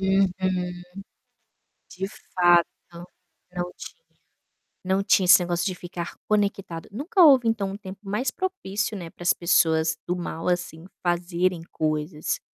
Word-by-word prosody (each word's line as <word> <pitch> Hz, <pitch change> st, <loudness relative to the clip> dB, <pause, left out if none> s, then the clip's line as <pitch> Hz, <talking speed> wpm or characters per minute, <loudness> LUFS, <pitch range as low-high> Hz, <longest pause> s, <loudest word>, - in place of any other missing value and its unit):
Uhum. 195 Hz, 0 st, +3 dB, 1.6 s
De 190 Hz, +1 st, -4 dB, 0.3 s
fato, 175 Hz, -1 st, +5 dB, 0.2 s
não 180 Hz, +1 st, -9 dB
tinha -, -, -11 dB, 0.8 s
não 190 Hz, +1 st, +1 dB
tinha 195 Hz, -1 st, +3 dB
esse 180 Hz, +1 st, +8 dB
negócio 175 Hz, 0 st, -1 dB
de 185 Hz, -, -1 dB
ficar 175 Hz, -1 st, -7 dB
conectado. 200 Hz, -5 st, -1 dB
Nunca 315 Hz, -, +1 dB
houve, 270 Hz, -7 st, +7 dB
então 210 Hz, -4 st, 0 dB
um -, -, -5 dB
tempo 195 Hz, -2 st, -10 dB
mais 210 Hz, +6 st, -2 dB
propício, 215 Hz, -, -3 dB
né, 170 Hz, -4 st, -7 dB
para -, -, -14 dB
as 175 Hz, -, +3 dB
pessoas 160 Hz, -2 st, +2 dB
do 180 Hz, -, -1 dB
mal, 170 Hz, -1 st, -4 dB
assim, 175 Hz, -2 st, -2 dB, 0.2 s
fazerem 175 Hz, 0 st, 0 dB
coisas. 155 Hz, 0 st, -2 dB
180 Hz, 135 wpm, -25 LUFS, 175-200 Hz, 1.6 s, esse